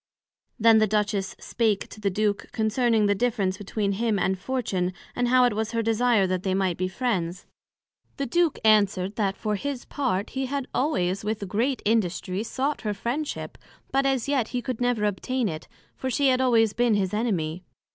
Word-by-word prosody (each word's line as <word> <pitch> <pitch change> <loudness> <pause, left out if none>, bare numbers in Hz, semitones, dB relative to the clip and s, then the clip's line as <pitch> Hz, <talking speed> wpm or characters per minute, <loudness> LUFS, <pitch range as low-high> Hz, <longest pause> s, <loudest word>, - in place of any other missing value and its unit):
Then 225 0 +6
the 215 - +3
Duchess 205 -2 -1
spake 220 -4 0
to 215 - -12
the 200 - +1
Duke 205 +1 -1
concerning 220 0 +2
the 205 - +3
difference 205 -3 0
between 205 0 -2
him 220 +1 0
and 190 0 +1
Fortune, 190 -7 -1 0.2
and 245 0 +1
how 255 +1 +5
it 245 - +3
was 220 +2 -2
her 230 0 0
desire 225 -2 +3
that 185 -1 -1
they 190 0 0
might 190 -3 +1
be 185 - 0
friends. 185 -5 -2 0.7
The 280 - -1
Duke 340 +4 +1
answered, 200 -2 +3
That 200 -3 0
for 215 - -2
his 275 +3 -4
part 225 -9 -2
he 265 0 -2
had 275 0 -3
always 200 - 0
with 210 -1 -3
great 240 +8 -1
industry 195 -3 0
sought 270 +6 -2
her 210 -2 -2
friendship, 255 +9 -4 0.3
but 275 0 +2
as 265 -3 0
yet 270 -5 +1
he 250 +1 -3
could 250 -1 -4
never 245 -3 +1
obtain 235 +4 -1
it, 155 -4 -5 0.3
for 260 - -3
she 275 +2 +2
had 255 0 +2
always 225 -4 +3
been 240 -1 +2
his 190 -2 0
Enemy. 185 -7 -1
220 Hz, 185 wpm, -25 LUFS, 195-245 Hz, 0.7 s, Then